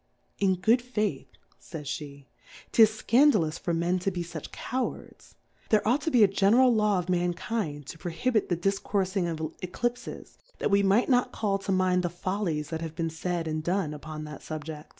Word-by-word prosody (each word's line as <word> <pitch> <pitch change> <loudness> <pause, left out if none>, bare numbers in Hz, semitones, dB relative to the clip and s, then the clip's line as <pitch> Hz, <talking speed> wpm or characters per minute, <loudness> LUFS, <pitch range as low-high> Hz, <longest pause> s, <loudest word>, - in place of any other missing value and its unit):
In 190 -2 +3
good 220 +7 +3
FaithJi^vj 210 - -2 1.5
J/^t^'tis 220 -1 +4
fcandalous 230 - +4
for 175 - -2
Men 170 +2 +1
to 180 - 0
be 175 -2 -3
fuch 165 -3 -8
Cowards; 255 +2 -5 0.3
there 215 -1 +3
ought 255 +6 +3
to 325 - -1
be 245 -7 +5
a - - +7
general 220 +6 +4
Law 210 -3 +2
of 180 -1 -2
Mankind 175 -3 -1
to 165 - -9
prohibit 215 +7 0
the 175 - +1
difcourfing 195 0 0
of 160 -1 -4
Eciipfes, 240 +7 -4 0.2
that - - -1
we 200 0 +5
might 200 +4 +3
not 250 -2 +2
call 200 -2 -1
to 195 - -3
mind 185 -1 +2
the 175 - -1
Follies 175 -4 -2
that 160 0 -3
have 160 -1 -5
been 165 -1 -2
laid, 175 -2 -1
and 155 0 -2
done, 175 -3 0
upon 155 +1 -7
that 150 -1 -8
SubjeQ 155 0 -6
185 Hz, 175 wpm, -28 LUFS, 165-215 Hz, 1.5 s, a